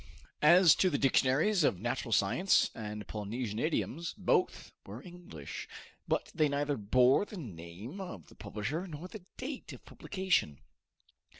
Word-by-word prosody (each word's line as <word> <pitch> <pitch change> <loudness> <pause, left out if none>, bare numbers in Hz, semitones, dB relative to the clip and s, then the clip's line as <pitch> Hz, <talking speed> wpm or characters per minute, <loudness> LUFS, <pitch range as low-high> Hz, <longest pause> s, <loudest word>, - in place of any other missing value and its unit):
As 170 +1 +7
to 185 - +3
the 145 - 0
dictionaries 140 +9 +3
of 95 - +2
natural 120 +2 -3
science 115 - +3
and 105 -2 -6
Polynesian 105 +1 -4
idioms, 165 +2 -2
both - - 0
were 105 +6 -9
English; 175 - -9 0.4
but - - -1
they 155 -1 +2
neither 145 0 0
bore 125 - +4
the 205 0 -9
name 105 - -8
of 105 - -8
the - - -18
publisher 145 - -4
nor 160 +1 -7
the 200 0 -10
date 265 +1 -6
of - - -13
publication. 190 - -1
140 Hz, 140 wpm, -32 LUFS, 105-175 Hz, 0.4 s, As